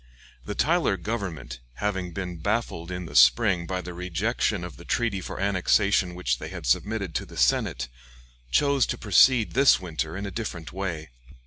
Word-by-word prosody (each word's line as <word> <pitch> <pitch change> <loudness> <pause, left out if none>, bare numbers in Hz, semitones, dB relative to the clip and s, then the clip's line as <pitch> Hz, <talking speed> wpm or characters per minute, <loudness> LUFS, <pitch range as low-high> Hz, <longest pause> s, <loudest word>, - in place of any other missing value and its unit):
The 105 - -5
Tyler 160 - +2
government, 90 - -5 0.2
having 95 -1 -2
been 90 0 -5
baffled 100 -3 -2
in 90 -1 -5
the 70 -3 -10
spring 80 - +5
by 90 +1 -2
the 90 0 -8
rejection 90 +3 -1
of 90 - -7
the 85 - -12
treaty 105 -1 -1
for - - -7
annexation 100 -1 +2
which 65 -9 -1
they - - -6
had - - -8
submitted 100 - 0
to - - -2
the - - -12
Senate, - - +1 0.6
chose 140 - +3
to - - -3
proceed 115 +3 +4
this 135 +2 +5
winter 80 -2 -4
in 100 - -4
a 100 - -5
different 90 -9 -6
way. 85 -7 -4
90 Hz, 175 wpm, -26 LUFS, 85-105 Hz, 0.6 s, spring